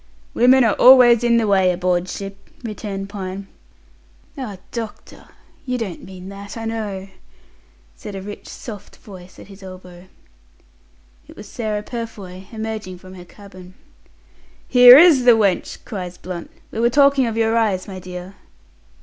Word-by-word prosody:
"Women 255 Hz, +2 st, +5 dB
are 225 Hz, -3 st, +3 dB
always 245 Hz, -2 st, +7 dB
in 235 Hz, -1 st, +3 dB
the 230 Hz, -, +1 dB
way 190 Hz, -3 st, +3 dB
aboard 180 Hz, 0 st, -1 dB
ship," 195 Hz, +1 st, -8 dB
returned 205 Hz, -3 st, -6 dB
Pine. 195 Hz, -1 st, -7 dB, 0.9 s
"Ah! 245 Hz, -9 st, -7 dB
Doctor, 225 Hz, -3 st, -8 dB, 0.4 s
you 250 Hz, -3 st, -3 dB
don't 205 Hz, -8 st, -6 dB
mean 185 Hz, 0 st, -11 dB
that, 200 Hz, +2 st, -9 dB
I 225 Hz, -, -6 dB
know," 210 Hz, -4 st, -4 dB, 0.9 s
said 205 Hz, -, -9 dB
a 195 Hz, -, -6 dB
rich 205 Hz, +1 st, -9 dB
soft 205 Hz, -4 st, -10 dB
voice 185 Hz, -3 st, -14 dB
at -, -, -12 dB
his 195 Hz, 0 st, -15 dB
elbow. 185 Hz, -1 st, -12 dB, 1.2 s
It -, -, -15 dB
was -, -, -10 dB
Sarah 215 Hz, -3 st, -4 dB
Purfoy 200 Hz, -6 st, -8 dB
emerging 220 Hz, -4 st, -6 dB
from 185 Hz, +1 st, -14 dB
her 180 Hz, -1 st, -12 dB
cabin. 185 Hz, -1 st, -15 dB, 0.9 s
"Here 250 Hz, 0 st, +9 dB
is 300 Hz, -6 st, +6 dB
the 240 Hz, -2 st, +7 dB
wench!" 200 Hz, -4 st, 0 dB
cries 180 Hz, -4 st, -7 dB
Blunt. 180 Hz, -1 st, -8 dB, 0.2 s
"We -, -, -5 dB
are 235 Hz, +1 st, +3 dB
talking 280 Hz, -1 st, +4 dB
of 225 Hz, -1 st, -4 dB
your 225 Hz, 0 st, +1 dB
eyes, 210 Hz, -5 st, 0 dB
my 190 Hz, -2 st, -8 dB
dear." 180 Hz, +1 st, -9 dB
205 Hz, 150 wpm, -20 LUFS, 185-230 Hz, 1.2 s, Here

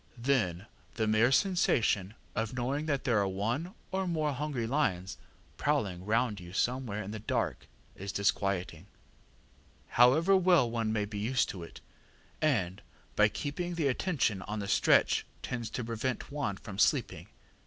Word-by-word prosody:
Then 115 Hz, -8 st, 0 dB, 0.3 s
the 110 Hz, -, 0 dB
mere 110 Hz, +3 st, +3 dB
sensation 115 Hz, -, +2 dB, 0.2 s
of 110 Hz, +2 st, -2 dB
knowing 135 Hz, +5 st, -1 dB
that 140 Hz, -3 st, 0 dB
there 120 Hz, -5 st, +2 dB
are 100 Hz, -, +1 dB
one 115 Hz, -, -2 dB, 0.2 s
or 190 Hz, 0 st, -1 dB
more 155 Hz, -4 st, 0 dB
hungry 140 Hz, -3 st, -2 dB
lions 110 Hz, -9 st, -1 dB, 0.4 s
prowling 100 Hz, -11 st, -1 dB
round 110 Hz, -1 st, +1 dB
you 90 Hz, 0 st, -10 dB
somewhere 120 Hz, -2 st, -1 dB
in 100 Hz, -, -6 dB
the 110 Hz, -, -5 dB
dark 105 Hz, -, -2 dB, 0.3 s
is 95 Hz, +1 st, -5 dB
disquieting, 95 Hz, -3 st, -1 dB, 1.0 s
however 155 Hz, +11 st, +5 dB
well 180 Hz, -8 st, +4 dB
one 115 Hz, -1 st, -1 dB
may 105 Hz, -2 st, 0 dB
be 105 Hz, 0 st, -6 dB
used 125 Hz, +4 st, +1 dB
to 95 Hz, -, -6 dB
it, 85 Hz, -, -10 dB, 0.6 s
and, 105 Hz, -, +1 dB, 0.3 s
by 105 Hz, -, +6 dB
keeping 160 Hz, -, -4 dB
the 165 Hz, -3 st, 0 dB
attention 130 Hz, -, 0 dB
on 105 Hz, +2 st, -5 dB
the 100 Hz, -1 st, -4 dB
stretch, -, -, +4 dB, 0.2 s
tends 120 Hz, -3 st, -3 dB
to 125 Hz, -, -4 dB
prevent 120 Hz, +4 st, -3 dB
one 140 Hz, -9 st, -2 dB
from 100 Hz, -1 st, -8 dB
sleeping. -, -, +1 dB
115 Hz, 155 wpm, -31 LUFS, 100-140 Hz, 1.0 s, by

